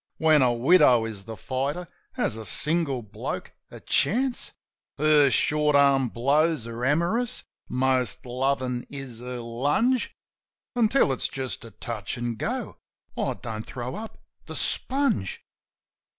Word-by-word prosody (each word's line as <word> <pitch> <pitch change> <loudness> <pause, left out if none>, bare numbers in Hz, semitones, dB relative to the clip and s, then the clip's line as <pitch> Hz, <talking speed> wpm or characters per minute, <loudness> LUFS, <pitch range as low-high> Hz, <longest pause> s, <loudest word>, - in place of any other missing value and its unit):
(When 155 -2 +5
a 125 -2 +4
widow 125 -1 +5
is 105 -3 -7
the 110 -1 -7
fighter, 140 - -2 0.3
has 245 - -1
a 110 - -7
single 150 +1 0
bloke 110 - -5 0.2
a - - -10
chance?) 255 +2 0 0.5
Her 150 -2 +5
short 150 +2 +2
arm 140 -3 +4
blows 145 +3 +2
are 115 +1 -6
amorous, 170 - +1 0.3
most 130 -1 0
lovin' 125 0 -1
is 135 -5 -7
her 125 +1 -6
lunge; 145 - 0 0.6
Until 235 - +3
it's - - -1
just 130 -2 -5
a - - -9
touch 110 +1 -5
an' 120 0 -2
go 110 - -4 0.4
I - - -1
don't 110 -1 -6
throw 125 +1 -6
up 220 0 -7 0.3
the - - -6
sponge. 265 - 0
135 Hz, 135 wpm, -26 LUFS, 120-155 Hz, 0.6 s, When